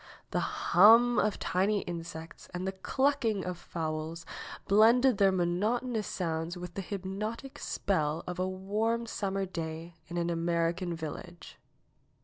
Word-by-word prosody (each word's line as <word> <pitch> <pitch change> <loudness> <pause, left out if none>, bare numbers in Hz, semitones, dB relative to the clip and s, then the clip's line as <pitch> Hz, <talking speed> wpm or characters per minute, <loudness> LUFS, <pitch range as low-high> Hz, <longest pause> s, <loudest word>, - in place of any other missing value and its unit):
The - - +1
hum 230 +6 +5
of 210 0 +1
tiny 195 +3 +1
insects 165 -1 -7
and 180 +1 -3
the 190 - 0
clucking 230 0 0
of 180 0 -3
fowls 160 -1 -4 0.4
blended 230 +3 +5
their 195 -1 +6
monotonous 210 +6 0
sounds 165 0 -2
with 175 -1 -7
the 195 - -3
hypnotic 200 +7 -5
spell 160 -4 -1
of 180 0 -5
a 185 0 0
warm 215 +5 -1
summer 195 -3 -2
day 165 -1 -5
in 175 +2 -5
an 170 0 0
American 170 +1 0
village. 165 +2 -8
185 Hz, 130 wpm, -30 LUFS, 170-210 Hz, 0.4 s, their